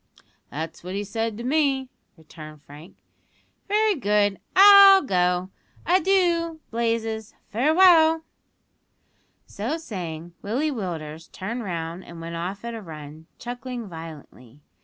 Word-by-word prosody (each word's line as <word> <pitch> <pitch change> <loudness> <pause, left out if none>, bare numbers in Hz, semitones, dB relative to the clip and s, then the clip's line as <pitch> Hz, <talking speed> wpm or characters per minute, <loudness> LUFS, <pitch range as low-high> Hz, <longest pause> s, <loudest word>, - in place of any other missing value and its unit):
"That's 160 +3 -7
what 185 +2 -6
he 205 - -2
said 225 +1 -3
to 235 - -7
me," 270 -1 0 0.3
returned 155 -1 -13
Frank. 150 +5 -14 0.7
"Very 425 +1 +2
good; 205 - +1 0.2
I'll 395 0 +9
go. 180 -4 0 0.3
Adoo, 350 -3 +2
Blazes 225 -1 -2
farewell." 320 - +4 1.2
So 235 +11 -4
saying, 175 - -7
Willie 265 +9 -1
Willders 165 - -6
turned 230 +6 -5
round 170 -1 -5
and 170 -1 -12
went 165 0 -7
off 185 +6 -5
at 235 - -5
a 225 - -7
run, 155 -2 -11
chuckling 245 -1 -7
violently. 155 -6 -12
210 Hz, 115 wpm, -24 LUFS, -, 1.2 s, I'll